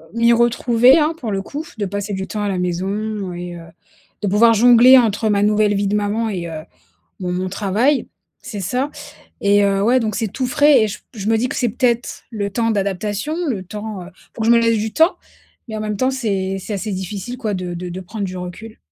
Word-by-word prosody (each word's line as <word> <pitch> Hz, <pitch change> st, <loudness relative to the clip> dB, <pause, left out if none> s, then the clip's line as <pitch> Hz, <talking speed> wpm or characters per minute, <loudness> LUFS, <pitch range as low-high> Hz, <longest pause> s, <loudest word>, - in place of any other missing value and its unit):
m'y 235 Hz, 0 st, +4 dB
retrouver, 240 Hz, +2 st, +4 dB
hein, 310 Hz, 0 st, +2 dB
pour 225 Hz, -4 st, -4 dB
le 195 Hz, 0 st, -2 dB
coup. 295 Hz, +8 st, -6 dB
De 205 Hz, -, -1 dB
passer 205 Hz, +1 st, -4 dB
du 190 Hz, 0 st, -3 dB
temps 210 Hz, -, -4 dB
à 205 Hz, -, -1 dB
la 190 Hz, -, -1 dB
maison 195 Hz, +2 st, -3 dB
et 175 Hz, 0 st, -6 dB
heu, 165 Hz, -1 st, -11 dB, 0.6 s
de -, -, +1 dB
pouvoir 225 Hz, +4 st, +5 dB
jongler 245 Hz, +3 st, +7 dB
entre 220 Hz, -2 st, +2 dB
ma 205 Hz, 0 st, +2 dB
nouvelle 210 Hz, 0 st, +3 dB
vie 200 Hz, 0 st, 0 dB
de 205 Hz, -, 0 dB
maman 210 Hz, +2 st, 0 dB
et 180 Hz, -4 st, -4 dB
heu, 160 Hz, -1 st, -6 dB, 0.6 s
mon 180 Hz, -1 st, -3 dB
mon 185 Hz, +1 st, -2 dB
travail. 215 Hz, +8 st, +1 dB, 0.4 s
C'est 205 Hz, -, -6 dB
ça 250 Hz, +10 st, -1 dB, 0.5 s
et 205 Hz, 0 st, +4 dB
heu, 195 Hz, 0 st, +1 dB
ouais 245 Hz, +4 st, +4 dB
donc 215 Hz, -3 st, -2 dB
c'est 225 Hz, -, -1 dB
tout 255 Hz, +6 st, -3 dB
frais 285 Hz, 0 st, +4 dB
et 220 Hz, -, +1 dB
j 210 Hz, -, -6 dB
p 225 Hz, -, -18 dB
je 200 Hz, +2 st, -3 dB
me 225 Hz, -, +3 dB
dis 245 Hz, +3 st, 0 dB
que -, -, -5 dB
c'est 245 Hz, -, +1 dB
peut-être 240 Hz, 0 st, -1 dB
le 205 Hz, -3 st, -3 dB
temps 230 Hz, +2 st, 0 dB
d'adaptation, 205 Hz, -, -2 dB
le 200 Hz, -7 st, -3 dB
temps, 210 Hz, 0 st, -6 dB
heu, -, -, -11 dB, 0.3 s
faut 225 Hz, -, -5 dB
que -, -, 0 dB
je 235 Hz, -, +6 dB
me 235 Hz, -, +6 dB
laisse 230 Hz, -1 st, +2 dB
du 215 Hz, +1 st, -3 dB
temps. 325 Hz, +3 st, +3 dB, 0.5 s
Mais 220 Hz, -, -5 dB
en -, -, -4 dB
même 210 Hz, -1 st, -3 dB
temps, 255 Hz, +6 st, +1 dB
c'est 195 Hz, -7 st, -2 dB
c'est 210 Hz, -, -7 dB
assez 205 Hz, +2 st, -4 dB
difficile 195 Hz, +6 st, -5 dB
quoi 215 Hz, -5 st, -2 dB
de 180 Hz, -1 st, -4 dB
de 180 Hz, +1 st, -5 dB
de 180 Hz, +2 st, -6 dB
prendre 200 Hz, +3 st, -5 dB
du 185 Hz, -1 st, -5 dB
recul. 180 Hz, +5 st, -8 dB
210 Hz, 240 wpm, -19 LUFS, 195-235 Hz, 0.6 s, jongler